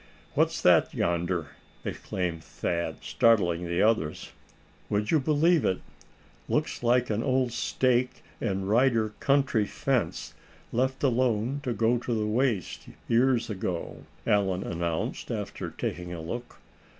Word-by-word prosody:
"What's - - +2
that - - +5
yonder?" 85 0 0 0.4
exclaimed 85 -3 -3
Thad, 85 +1 -3
startling 90 -7 +2
the 85 +3 +1
others. 105 -9 0 0.6
"Would 105 +1 0
you 160 - +5
believe 155 +3 +3
it, 95 - +1 0.7
looks - - 0
like 120 0 +2
an 105 +1 0
old 130 0 +1
stake 125 +1 0 0.2
and 95 0 -1
rider 115 0 +3
country 135 -7 +2
fence, 135 -1 -1 0.4
left 130 +3 0
alone 125 0 +1
to 130 -4 -2
go 115 +3 +2
to 120 0 -2
the 105 - 0
waste 110 - -1 0.2
years 120 0 +3
ago?" 95 -5 -4 0.2
Allan 95 -4 +2
announced, 85 -1 -3
after - - -4
taking 90 0 -4
a 85 - -5
look. 120 +10 -6
115 Hz, 125 wpm, -28 LUFS, 90-125 Hz, 0.7 s, that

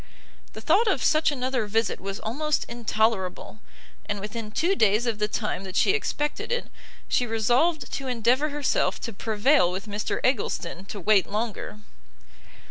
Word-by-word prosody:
The - - -8
thought 455 +2 +3
of 290 - +1
such 310 0 +3
another 255 -4 -1
visit 225 +1 0
was 195 +1 -5
almost 300 +7 -1
intolerable; 220 -4 -1 0.5
and 205 0 -2
within 215 +2 -5
two 335 - +1
days 215 - +3
of 225 -3 -1
the 210 - +1
time 210 -3 -2
that 190 -1 -8
she - - +4
expected 345 -4 -2
it, 485 0 -2 0.4
she 245 - +1
resolved 245 +9 +1
to 270 - -3
endeavour 250 +4 +2
herself 290 -1 0
to 230 - -5
prevail 215 +1 +2
with 190 +3 -5
Mr 210 0 -3
Eggleston 195 -7 -1
to 205 - -7
wait 200 0 +3
longer. 210 0 -4
225 Hz, 155 wpm, -26 LUFS, 210-270 Hz, 0.5 s, she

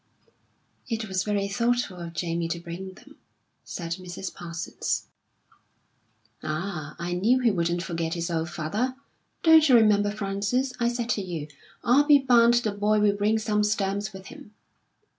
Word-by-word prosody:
"It 225 -1 -2
was 190 -1 -1
very 205 -1 0
thoughtful 235 -1 0
of 170 -1 -7
Jamie 165 0 -1
to 170 +1 -3
bring 175 +3 -7
them," - - -17 0.5
said 170 0 -5
Mrs. 180 +1 -7
Parsons. 170 -1 -4 1.4
"Ah, 155 -1 -4
I 175 +1 -3
knew 215 +8 +3
he 235 -2 +4
wouldn't 175 -1 -1
forget 165 -1 -3
his 170 +1 -3
old 165 0 -1
father. 205 +11 -2 0.5
Don't 320 -2 +7
you 255 - +7
remember, 210 -3 +4
Frances, 205 +5 -1
I 235 - +2
said 240 0 -2
to 210 - +1
you, 165 -5 -5 0.3
'I'll 265 +5 +4
be 295 -1 +7
bound 240 -3 +5
the 235 -3 +1
boy 210 +1 +1
will 205 -1 +3
bring 210 +2 +2
some 210 -1 0
stamps 205 -1 -1
with 190 -1 -11
him.' 210 - -14
200 Hz, 160 wpm, -26 LUFS, 175-230 Hz, 1.4 s, Don't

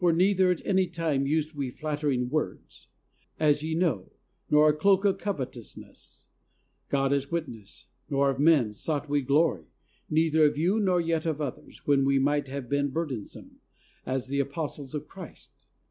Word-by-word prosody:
For 175 -1 +4
neither 185 +2 +3
at 180 - -1
any 190 -1 +2
time 160 -6 -1
used 155 +1 0
we 140 -3 -3
flattering 145 -3 -2
words, 155 - -4 0.5
as 150 -2 +3
ye 160 +1 -2
know, 160 - 0 0.4
nor 150 +1 +6
a - - +3
cloak 195 +5 +3
of 195 - +2
covetousness; 130 - -7 0.6
God 135 0 +1
is 140 0 -1
witness; 120 -12 -5 0.2
nor 140 0 +2
of 135 - -6
men 145 -8 +4
sought 150 +6 -3
we 145 0 +1
glory, 140 - +1 0.4
neither 160 0 +3
of 145 -1 +3
you 180 +8 +2
nor 185 -4 +2
yet 165 -1 0
of 155 -2 -1
others, 145 -4 -7
when 140 -2 +3
we 135 0 +3
might 145 +1 +1
have 135 -1 -6
been 140 +2 +1
burdensome, 135 -8 -6 0.4
as 130 -1 -2
the 140 +2 -2
apostles 140 0 -3
of 150 0 -5
Christ. 185 -4 -12
150 Hz, 165 wpm, -27 LUFS, 140-165 Hz, 0.6 s, nor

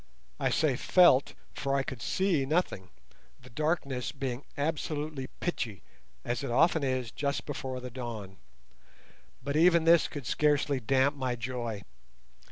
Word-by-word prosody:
I - - +1
say 145 -5 +1
felt, 175 -8 +5 0.2
for 140 -1 -1
I 135 - +1
could 130 -3 -6
see 185 0 +1
nothing, 135 - -1 0.5
the 130 -1 -16
darkness 140 -4 -1
being 135 -2 -4
absolutely 150 -2 -2
pitchy, 115 - -3 0.4
as 120 -1 -2
it - - -3
often 155 +5 +3
is 130 -4 -1
just 140 -1 -2
before 130 -3 -4
the 125 0 -7
dawn. 115 -6 -6 1.1
But 140 +2 -2
even 170 +1 +5
this 165 0 +5
could 145 -4 -7
scarcely 145 -1 +2
damp 135 +4 +2
my 130 -3 -2
joy. 120 -3 -4
135 Hz, 140 wpm, -30 LUFS, 125-150 Hz, 1.1 s, felt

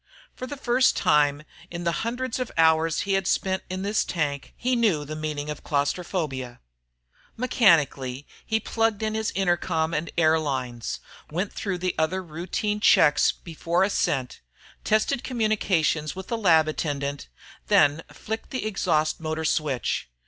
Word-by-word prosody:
For 255 - -7
the 285 - -6
first 255 0 +2
time 145 0 +3 0.3
in 170 0 -6
the 170 - +1
hundreds 245 +2 -3
of 255 - -3
hours 160 0 +3
he'd 195 -1 0
spent 190 -1 0
in 185 +1 -4
the 205 +1 -2
tank, 145 -9 -1
he 250 +1 0
knew 200 -11 +2
the 155 +2 -6
meaning 155 -1 -4
of 150 - -8
claustrophobia. 145 -4 -2 0.8
Mechanically, 145 - +2 0.2
he 220 0 0
plugged 225 -1 0
in 215 0 -1
his 220 0 -1
intercom 175 -3 0
and 165 +2 -2
air 160 -1 +4
lines, 125 -6 -3 0.3
went 180 +6 -3
through 195 -3 -3
the 180 +1 -1
other 185 +4 0
routine 185 +6 -3
checks 150 -7 +5
before 170 +2 -1
ascent, 135 -9 -1 0.4
tested 220 +5 +1
communications 195 - 0
with 190 0 -8
the 235 - 0
lab 165 -7 +4
attendant, 145 -2 -3 0.4
then 145 +1 +4
flicked 220 +1 -6
the 255 -4 -3
exhaust 170 -7 0
motor 160 0 -3
switch. 145 - -1
170 Hz, 145 wpm, -25 LUFS, 150-210 Hz, 0.8 s, checks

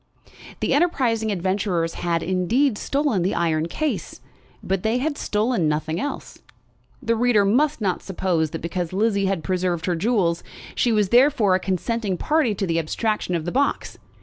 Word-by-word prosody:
The - - +1
enterprising 250 -9 +1
adventurers 185 -3 -1
had, 170 -1 -1
indeed, 210 +9 +1
stolen 280 -9 0
the 185 +3 0
iron 160 -1 0
case, 305 - -3 0.4
but 190 -1 -1
they 220 +4 +1
had 290 +3 -1
stolen 215 - 0
nothing 155 +2 -2
else. 285 +6 -5 0.6
The 230 -1 +1
reader 225 -3 +3
must 275 +6 +2
not 190 -3 0
suppose 175 -4 -1
that 165 - -6
because 175 0 -3
Lizzie 200 -1 +1
had 190 -5 -1
preserved 180 -2 -1
her 180 - 0
jewels, 175 -3 +1 0.3
she 240 - +1
was 210 -3 +2
therefore 245 -5 +4
a 185 - +3
consenting 195 +1 -2
party 295 - +1
to 195 - -2
the 165 -2 0
abstraction 180 +3 -1
of 160 -2 -3
the 175 - -2
box. 280 +2 -1
195 Hz, 165 wpm, -23 LUFS, 175-235 Hz, 0.6 s, therefore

